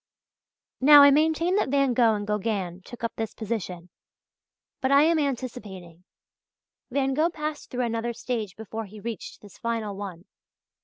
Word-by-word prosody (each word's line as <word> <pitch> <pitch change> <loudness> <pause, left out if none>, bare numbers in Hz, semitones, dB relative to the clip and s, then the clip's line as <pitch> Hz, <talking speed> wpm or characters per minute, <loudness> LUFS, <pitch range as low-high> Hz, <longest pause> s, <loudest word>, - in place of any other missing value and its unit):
Now 290 +2 +9
I 285 - +8
maintain 320 +5 +2
that 415 - +1
Van 275 -2 +2
Gogh 230 -2 +4
and 205 0 -4
Gauguin 200 -4 -2
took 240 +3 -11
up 230 - -1
this 225 -1 -4
position. 185 -6 -5 0.9
But 260 - +1
I 280 +1 +7
am 325 0 +3
anticipating. 200 - -5 0.8
Van 270 0 0
Gogh 310 +5 +2
passed 305 -2 -5
through 250 -1 -1
another 230 0 -2
stage 225 -5 -4
before 220 0 -6
he 210 +2 -12
reached 230 +1 -7
this 205 -2 -15
final 225 -3 -2
one. 190 -3 -7
230 Hz, 155 wpm, -26 LUFS, 205-275 Hz, 0.9 s, Now